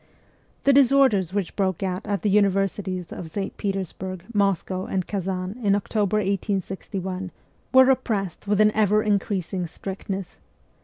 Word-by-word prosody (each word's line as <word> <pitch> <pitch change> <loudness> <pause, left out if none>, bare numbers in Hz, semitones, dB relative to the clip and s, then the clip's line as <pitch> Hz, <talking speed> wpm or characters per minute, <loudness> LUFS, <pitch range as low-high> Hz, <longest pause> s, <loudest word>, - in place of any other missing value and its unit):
The 275 - +5
disorders 260 - +4
which 195 -3 -2
broke 190 -2 0
out 185 +2 -3
at 200 -1 -1
the 210 - +2
universities 195 -3 +1
of 165 - -7
St. 195 +4 -4
Petersburg, 190 -2 -4
Moscow, 195 -2 0
and 185 -2 -1
Kazan 190 +2 -3
in 200 -3 +3
October 205 0 0
1861 190 -1 -2 0.4
were 260 0 +8
repressed 220 -9 0
with 205 0 +2
an 215 0 +6
ever 215 0 +3
increasing 195 -3 -1
strictness. 190 +1 -6
195 Hz, 135 wpm, -24 LUFS, 185-210 Hz, 0.4 s, were